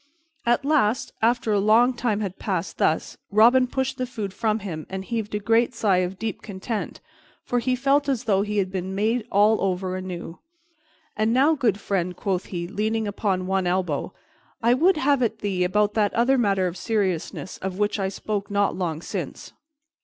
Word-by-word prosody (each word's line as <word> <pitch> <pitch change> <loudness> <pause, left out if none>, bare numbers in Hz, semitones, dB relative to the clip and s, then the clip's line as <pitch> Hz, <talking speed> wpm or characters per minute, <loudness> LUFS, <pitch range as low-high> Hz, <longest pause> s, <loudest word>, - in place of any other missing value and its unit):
At 240 +3 +2
last, 265 -4 +1
after 235 0 +2
a 205 - +3
long 225 +5 +4
time 235 -4 -1
had 195 -3 -4
passed - - -3
thus, - - 0
Robin 240 +5 +5
pushed 265 +1 -2
the 255 - -1
food 210 -6 -5
from 215 +2 0
him 155 -5 -5
and 190 0 -5
heaved 225 -3 -3
a - - 0
great 230 +4 +2
sigh 195 -4 +2
of 185 +1 -1
deep 220 -2 -4
content, 205 +2 -5 0.4
for 245 - 0
he 255 +2 0
felt 280 +3 +2
as 255 -3 0
though 200 -5 +2
he 210 +1 -2
had 190 -2 0
been 190 0 -4
made 220 +3 0
all 210 +2 +4
over 185 -1 -1
anew. 180 -2 -6 0.8
"And 215 +2 +1
now, 280 +5 +5
good 230 -9 +1
friend," 180 -3 -1
quoth 190 -1 -2
he, 170 -2 -4
leaning 215 +3 -1
upon 195 -2 -1
one 190 -1 0
elbow, 175 -5 -1 0.5
"I 235 +1 +5
would 340 +7 +3
have 280 -2 +2
at 235 - 0
thee 190 -3 -1
about 210 +3 +2
that 210 -2 +1
other 250 +3 +3
matter 195 -5 +2
of 180 0 -3
seriousness 190 -4 -2
of 190 -1 -4
which 210 0 0
I 190 -1 0
spoke 205 +1 -4
not 200 0 +1
long 170 -3 -3
since." - - -6
210 Hz, 190 wpm, -24 LUFS, 190-235 Hz, 0.8 s, Robin